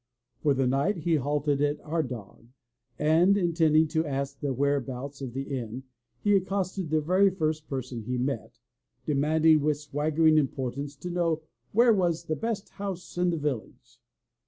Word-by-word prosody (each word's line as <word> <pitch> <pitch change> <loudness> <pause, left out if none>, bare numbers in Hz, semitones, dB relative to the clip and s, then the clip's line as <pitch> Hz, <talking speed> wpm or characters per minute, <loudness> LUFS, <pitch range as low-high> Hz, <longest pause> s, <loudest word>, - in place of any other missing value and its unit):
For 145 -2 +3
the 135 0 +1
night 140 +10 +1
he 165 0 +1
halted 145 +1 0
at 145 0 +1
Ardagh, 130 -9 -4 0.5
and, 165 +6 +4
intending 160 -3 +3
to 160 +1 +1
ask 140 -2 -3
the 145 -2 -2
whereabouts 140 0 -2
of 130 -3 -5
the 135 +1 -3
inn, 125 -2 -5 0.4
he 205 -1 +4
accosted 190 -2 -1
the 155 0 +2
very 185 +6 +4
first 155 -4 -2
per 135 -2 -3
son 125 -2 -7
he 125 +4 -3
met, 125 -2 -3 0.5
demanding 155 +2 +3
with 150 0 +1
swaggering 155 +2 +2
importance 135 0 -3
to 175 +5 -6
know 165 -3 0 0.3
where 235 +2 +5
was 175 -4 +1
the 155 - -1
best 220 +1 -3
house 195 -3 -6
in 180 0 +2
the 170 - 0
village." 145 -7 -5
150 Hz, 160 wpm, -28 LUFS, 135-170 Hz, 0.5 s, where